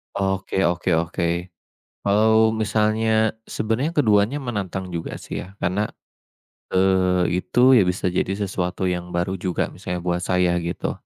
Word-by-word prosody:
Oke 95 0 -1
oke 85 -1 +1
oke, 85 +2 -1 0.5
kalau 110 +2 +4
misalnya 110 0 +1 0.2
sebenarnya 120 +10 -1
keduanya 110 -2 +3
menantang 100 -8 -4
juga, 85 -1 -4
sih, - - -6
ya, 95 +2 -11
karena, 100 +3 -1 0.8
eee, 90 -1 +2
itu, 125 +8 +4
ya, 105 -8 +5
bisa 90 0 -1
jadi 90 - 0
sesuatu 95 -2 -2
yang 90 -1 -2
baru 90 +2 -1
juga 90 -1 -2
misalnya 90 -1 -5
buat 90 0 0
saya 90 -1 +1
gitu, 85 +1 -3
95 Hz, 135 wpm, -22 LUFS, 90-110 Hz, 0.8 s, ya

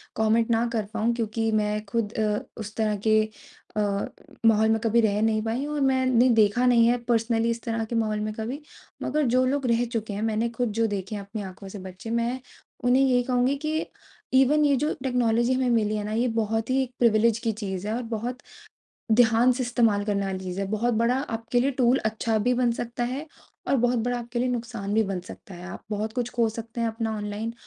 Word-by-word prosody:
Comment 225 +1 +2
ना 230 +1 +2
कर 220 - 0
पाऊँ 225 +1 +1
क्योंकि 225 -1 -1
मैं 210 0 0
खुद 215 +1 -2
अ, 210 -1 0 0.2
उस 215 0 -7
तरह 215 -2 +1
के 215 0 +5 0.6
अ, - - +3 0.6
माहौल 220 -1 +5
में 220 0 +2
कभी 230 +1 +3
रह 210 -1 +1
नहीं 220 -1 +2
पाई 230 +5 -2
हूँ 300 - -4
और 290 - -1
मैंने 260 -2 +3
देखा 215 +4 +2
नहीं 235 -2 +5
है 245 - +3
पर्सनली 230 0 +2
इस 230 0 -2
तरह 225 -1 -2
के 235 - -5
माहौल 215 -2 0
में 215 0 -3
कभी। 235 +7 -5 0.4
मगर 300 -1 0
जो 255 0 +4
लोग 275 +1 0
रह 235 0 +2
चुके 225 -3 -4
हैं 200 - -4
मैंने 225 +1 0
खुद 235 0 -2
जो 225 - +3
देखे 200 0 -4
हैं 205 - -4
अपनी 205 +2 -6
आँखों 195 0 -9
से 205 - -8
बच्चे 185 +3 -9
मैं 235 +2 0 0.4
उन्हें 250 +2 +4
यही 250 -2 +3
कहूँगी 250 +2 +1
कि 315 +1 -1 0.5
इवन 275 +3 +5
ये 285 -1 +4
जो 300 +4 0
टेक्नोलॉजी 240 -1 +2
हमें 255 -1 +1
मिली 215 -3 +2
है 210 - -2
ना 210 - -4
ये 235 +3 +1
बहुत 225 0 -1
ही 265 +1 +2
एक 255 - -7
प्रिविलेज 230 -1 +4
की 230 -1 0
चीज़ 200 -2 -5
है 215 - -1
और 250 - -3
बहुत 240 +3 -3 0.7
ध्यान 235 +2 +5
से 255 +1 -2
इस्तेमाल 230 -4 +2
करने 200 -1 0
वाली 190 -1 -3
चीज़ 180 0 -5
है। 195 - -1
बहुत 225 +3 +1
बड़ा 235 +3 +2
आपके 230 -2 -1
लिए 270 +3 +2
टूल 255 0 +3
अच्छा 220 +1 0
भी 245 +4 +1
बन 245 -1 +2
सकता 240 +1 -3
है, 265 +5 -4 0.4
और 275 - +3
बहुत 245 0 +2
बड़ा 245 +2 -1
आपके 240 0 -5
लिए 250 +1 +1
नुकसान 230 -4 -3
भी 220 - +4
बन 195 -2 -3
सकता 190 - -11
है। 175 +1 -9
आप - - -9
बहुत 215 +1 -2
कुछ 245 -1 -2
खो 230 -2 +1
सकते 230 +1 -6
हैं 230 - +1
अपना 225 -1 -3
ऑनलाइन, 210 +2 -4
230 Hz, 225 wpm, -25 LUFS, 215-245 Hz, 0.7 s, के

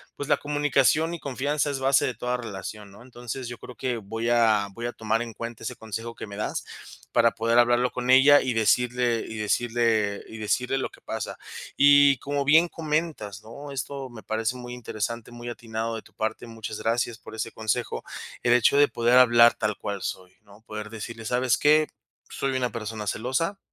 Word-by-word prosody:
pues, 145 - -6
la - - +4
comunicación 145 +2 +2
y 170 - -5
confianza 145 +1 -1
es 135 - -3
base 135 0 +3
de 130 - -1
toda 125 +2 -2
relación, 105 -2 -7
¿no? 100 +3 -15
Entonces, 125 0 -7
yo 120 - -7
creo 125 - -11
que 125 -1 -2
voy 115 +3 -3
a 110 -4 +3
voy 120 +3 -6
a 120 - -3
tomar 110 +1 -1
en 120 -1 -5
cuenta 115 +1 -7
ese - - -4
consejo 115 +1 -6
que - - -7
me 100 -1 -9
das 105 - -3 0.5
para 115 -1 +4
poder 115 +2 +2
hablarlo 120 +1 +3
con 125 0 -4
ella 140 +3 +8
y 130 -2 -1
decirle 120 +1 +2
y 110 - -7
decirle 110 -1 +1
y 110 - -9
decirle 125 +5 0
lo 130 - -2
que - - -19
pasa. - - -5 0.4
Y 145 -1 +6
como 140 +1 -2
bien 155 +4 +7
comentas, 150 -12 -3
¿no?, 140 +6 -9
esto 135 0 -5
me 110 - -10
parece 110 +4 -2
muy 125 0 -8
interesante, 115 0 -5
muy 120 0 -7
atinado 115 -1 -4
de 110 - -7
tu - - -21
parte, 110 +2 -3
muchas 110 -2 -7
gracias 115 0 0
por - - -12
ese 110 +1 -4
consejo. 110 +2 -2 0.4
El 120 - +4
hecho 125 +3 +4
de 145 0 +6
poder 120 +2 +3
hablar 120 -1 +7
tal 105 -1 -1
cual 100 -1 -4
soy, 90 0 -6
¿no?, 100 +1 -18
poder 110 -1 -7
decirles: 115 0 -6
"¿Sabes 125 0 +2
qué?, 155 +1 +4 0.4
soy 135 -1 -2
una 125 -1 0
persona 110 -2 -5
celosa. 130 - -1
120 Hz, 195 wpm, -26 LUFS, 110-130 Hz, 0.5 s, ella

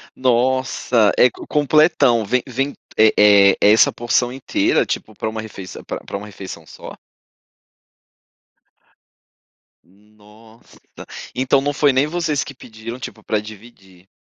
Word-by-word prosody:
Nossa, 130 -3 +1
é 125 - +6
co - - -12
completão. 145 -5 +3
Vem 125 +5 0
vem, 135 +3 -2 0.2
eh 110 0 +5
eh, 100 -2 +6
é 105 - +5
essa 110 - +4
porção 120 +1 0
inteira, 130 0 0
tipo, - - -5
pra - - -5
uma 110 0 -5
refeiçã 100 -4 -10
pra - - -6
pra - - -7
uma 100 - -9
refeição 95 -5 -10
só? - - -11 2.9
Nossa! 105 +3 -21 0.6
Então 130 +2 +2
não 145 +1 -1
foi 145 -1 +2
nem 135 +3 +2
vocês 160 -3 -2
que 140 - -11
pediram, 115 +1 -10
tipo, 110 -3 -9
pra 110 - -1
dividir. 105 -4 -14
115 Hz, 135 wpm, -19 LUFS, 105-130 Hz, 2.9 s, é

